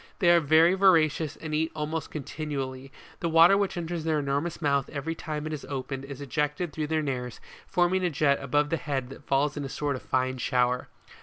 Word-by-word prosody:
They 175 -4 +4
are 170 - +6
very 160 +3 +5
voracious 165 -5 +3
and 155 -1 -7
eat 160 +1 0
almost 155 0 -3
continually; 135 -3 -5 0.3
the 170 - -1
water 165 +4 +7
which 200 -2 0
enters 170 -1 -3
their 160 -1 +1
enormous 145 +3 -1
mouth 140 -4 +1
every 150 +3 -3
time 155 -2 -5
it 155 - -4
is 150 - -5
opened, 135 -1 -5
is 140 0 -8
ejected 150 +4 -2
through 155 -1 -2
the 155 0 0
nares, 125 -4 -4 0.3
forming 180 +1 +2
a 180 - +2
jet 140 -2 +2
above 145 +2 +1
the 165 - +2
head 135 -5 -3
that 135 - -12
falls 140 +1 +1
in 145 - -4
a 135 - -5
sort 145 0 -2
of 130 - -7
fine 130 0 -1
shower. 125 0 +1
150 Hz, 210 wpm, -27 LUFS, 135-165 Hz, 0.3 s, water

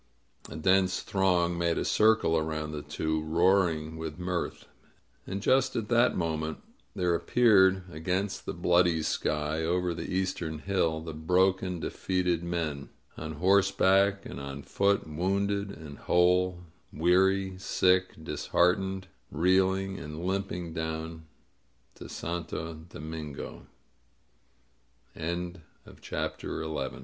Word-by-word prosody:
A - - -8
dense 95 +3 +2
throng 90 -3 +1
made 85 -1 +1
a - - -1
circle 110 -6 +4
around 80 -1 -2
the 75 -1 -5
two, 80 +1 -2
roaring 80 -1 +2
with 80 -1 -5
mirth. 90 -1 -3 0.6
And 95 +1 -4
just 130 0 +3
at 110 -2 -2
that 120 +1 +3
moment 80 -2 -2 0.4
there 90 -1 +1
appeared 95 -2 +4
against 90 +5 -2
the - - -2
bloody 85 -2 +3
sky, 75 0 -1
over 90 +1 0
the 85 - -6
eastern 90 -4 -2
hill, 80 -2 0
the 80 -1 -6
broken, 90 +3 +1
defeated 90 -1 -1
men 80 -5 -3
— - - -35
on 80 0 -6
horseback 100 +2 +3
and - - -7
on 70 0 -7
foot, 100 +1 +1
wounded 100 +5 -1
and 80 -7 -10
whole, 90 0 +2 0.3
weary, 95 +3 +2
sick, 90 -1 +2
disheartened, 90 +5 0 0.2
reeling 95 +3 +2
and 75 +2 -7
limping 95 -3 -2
down 80 0 -4 0.7
to - - -11
Santo 80 -1 -5
90 Hz, 110 wpm, -29 LUFS, 80-95 Hz, 0.7 s, circle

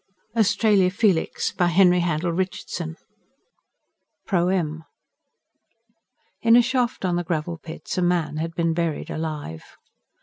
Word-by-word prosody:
Australia 210 -3 +3
Felix 195 -3 +1
by 175 - +1
Henry 180 +1 +5
Handel 170 0 0
Richardson 170 -2 -4 1.3
PROEM 175 -4 0 1.6
In 230 0 +5
a 245 - +8
shaft 245 -4 -1
on 175 -1 +1
the 175 - -1
Gravel 165 0 -3
Pits, 160 +3 -6
a - - +1
man 170 -4 0
had 165 +1 -4
been 165 -1 +1
buried 165 -2 -2
alive. 150 - -6
175 Hz, 115 wpm, -23 LUFS, 160-190 Hz, 1.6 s, a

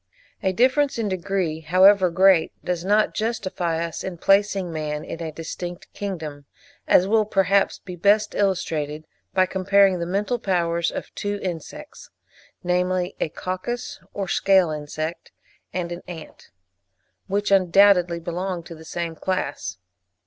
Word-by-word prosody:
A 190 - +1
difference 260 +7 +2
in 220 -3 -1
degree, 185 -3 -2
however 185 +4 +5
great, 185 -1 +4
does 175 -1 -2
not 210 +3 +2
justify 185 -7 -2
us 165 -2 -6
in 185 -2 -5
placing 195 -1 +2
man 150 -1 -3
in 165 - -7
a 160 -1 -4
distinct 175 +3 -7
kingdom, 155 -8 -6 0.4
as 180 - +5
will 220 +1 +3
perhaps 195 -1 +2
be 180 -2 -9
best 205 +4 +3
illustrated 160 -6 -1 0.3
by 185 -1 +5
comparing 190 0 +3
the 170 - -3
mental 210 +6 -1
powers 170 -4 0
of - - -7
two 205 0 -3
insects, 175 -4 -7 0.5
namely, 180 +1 0
a - - 0
coccus 185 +10 -5
or 195 -2 -4
scale 190 -2 +3
insect 155 +2 -5 0.4
and 175 -2 -3
an 175 +1 -5
ant, 165 -3 -10 0.8
which 205 +1 -1
undoubtedly 185 -2 +5
belong 175 +1 -4
to 170 - -10
the 160 0 -12
same 170 0 -4
class. 140 - -3
185 Hz, 140 wpm, -23 LUFS, 170-195 Hz, 0.8 s, however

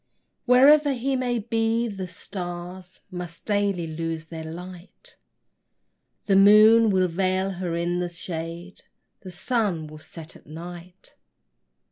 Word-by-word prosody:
Wherever 280 +3 +6
he 265 +2 -1
may 250 -2 -1
be, 225 +1 0
the 195 -4 -5
stars 180 0 -8
Must 175 -2 -8
daily 200 -4 0
lose 165 0 -4
their 160 0 -8
light; 175 +3 -10 1.1
The 195 - +2
moon 215 +3 +7
will 185 -2 +2
veil 185 +2 0
her 180 -2 -4
in 175 +1 -1
the 175 -1 -2
shade; 170 +1 -7 0.4
The 190 - -10
sun 185 -3 -1
will 155 0 -11
set 160 0 -11
at - - -18
night. 175 +3 -11
185 Hz, 125 wpm, -24 LUFS, 170-210 Hz, 1.1 s, moon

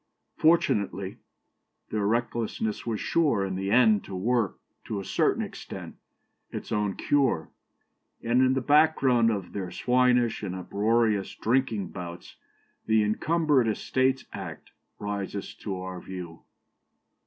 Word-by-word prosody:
Fortunately, 100 - +1 0.7
their 105 -2 0
recklessness 115 -1 -1
was 110 -3 -1
sure, 140 -12 +2
in 95 - -3
the 95 +1 -2
end, 110 -2 +5
to 95 - -7
work, 110 +1 0 0.3
to 105 - -3
a 95 - -6
certain - - +1
extent, - - -8 0.5
its - - -7
own 105 -2 0
cure; 130 - +1 0.7
and 120 +2 +3
in 130 0 +4
the 135 - 0
background 135 -5 +4
of 100 -5 -3
their 95 -3 -4
swinish 125 +1 +2
and 95 -3 -4
uproarious 105 +2 +1
drinking 115 -6 0
bouts, 85 -2 -8 0.5
the 110 -1 +4
Encumbered 145 +4 +2
Estates 130 +4 0
Act - - -8 0.3
rises 100 -1 -4
to 100 -3 -5
our 90 -1 -6
view." 90 -3 -8
110 Hz, 125 wpm, -27 LUFS, 95-125 Hz, 0.7 s, end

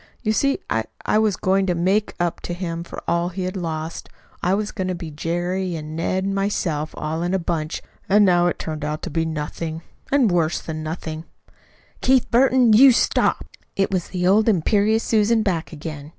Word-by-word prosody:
You 215 -2 +1
see, 275 +5 +2
I 110 0 0 0.2
I 215 - +3
was 215 -3 +2
going 190 +1 +1
to 180 - +1
make 190 +5 +1
up 175 -1 -1
to 175 - -4
him 170 -2 -4
for - - -9
all 170 +1 +1
he 185 +1 -5
had 185 +2 -3
lost. 165 -2 -4 0.3
I 180 +2 +2
was 210 +1 -2
going 185 -3 -3
to 185 - -1
be 170 -2 -7
Jerry 175 +4 -2
and 155 0 -6
Ned 185 +3 -1
and 195 0 -1
myself, 175 -6 -1
all 155 +2 -3
in 175 +2 0
a - - +3
bunch. 165 -3 -3 0.3
And 205 +1 +6
now 175 -2 +4
to 175 - +1
turn 155 -2 -5
out 150 +1 -3
to 175 - -4
be 165 +1 0
nothing 160 +1 -4 0.3
and 265 -7 +4
worse 170 -2 +1
than 155 -1 -6
nothing 160 0 -5 0.4
" - - -32
"Keith 260 -1 +3
Burton, 250 -1 +5
you 260 +5 +8
stop!" 235 - +1 0.3
It 195 0 +1
was 185 -3 -1
the 180 -1 -2
old 210 +4 +4
imperious 210 +4 +2
Susan 220 0 +2
back 180 -6 -1
again. 150 -2 -7
180 Hz, 205 wpm, -22 LUFS, 160-205 Hz, 0.4 s, you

